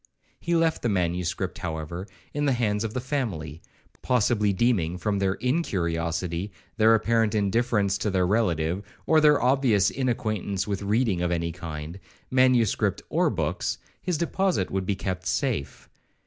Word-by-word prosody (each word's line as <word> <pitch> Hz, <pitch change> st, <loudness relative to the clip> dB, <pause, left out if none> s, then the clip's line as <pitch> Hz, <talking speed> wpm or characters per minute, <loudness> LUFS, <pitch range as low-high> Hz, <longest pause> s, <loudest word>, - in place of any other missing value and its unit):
He 170 Hz, 0 st, -1 dB
left 165 Hz, -1 st, +2 dB
the 120 Hz, -, 0 dB
manuscript, 90 Hz, -1 st, -1 dB
however, 85 Hz, +3 st, -5 dB, 0.3 s
in 145 Hz, 0 st, 0 dB
the 140 Hz, -, +3 dB
hands 105 Hz, -3 st, 0 dB
of 110 Hz, +1 st, -4 dB
the -, -, 0 dB
family, 105 Hz, -, -3 dB, 0.4 s
possibly 110 Hz, -4 st, +2 dB
deeming, 95 Hz, -5 st, +1 dB
from 100 Hz, +2 st, -1 dB
their 95 Hz, 0 st, +1 dB
incuriosity, 90 Hz, -, -1 dB, 0.3 s
their 110 Hz, +1 st, +6 dB
apparent 110 Hz, -1 st, +1 dB
indifference 105 Hz, -1 st, +1 dB
to 105 Hz, -, 0 dB
their 95 Hz, -2 st, +2 dB
relative, 90 Hz, -4 st, +1 dB, 0.2 s
or 160 Hz, -1 st, +4 dB
their 150 Hz, -1 st, +5 dB
obvious 125 Hz, -6 st, +3 dB
inacquaintance 110 Hz, -7 st, -1 dB
with 100 Hz, -2 st, -3 dB
reading 105 Hz, -2 st, +1 dB
of 90 Hz, -, +1 dB
any 85 Hz, -1 st, -1 dB
kind, 80 Hz, +1 st, -7 dB, 0.3 s
manuscript 130 Hz, -4 st, +3 dB
or -, -, +2 dB
books, -, -, -2 dB, 0.2 s
his 180 Hz, -3 st, -1 dB
deposit 170 Hz, -, 0 dB
would 95 Hz, -1 st, -2 dB
be 100 Hz, -, 0 dB, 0.2 s
safe. 110 Hz, -, -2 dB
105 Hz, 145 wpm, -26 LUFS, 90-125 Hz, 0.4 s, their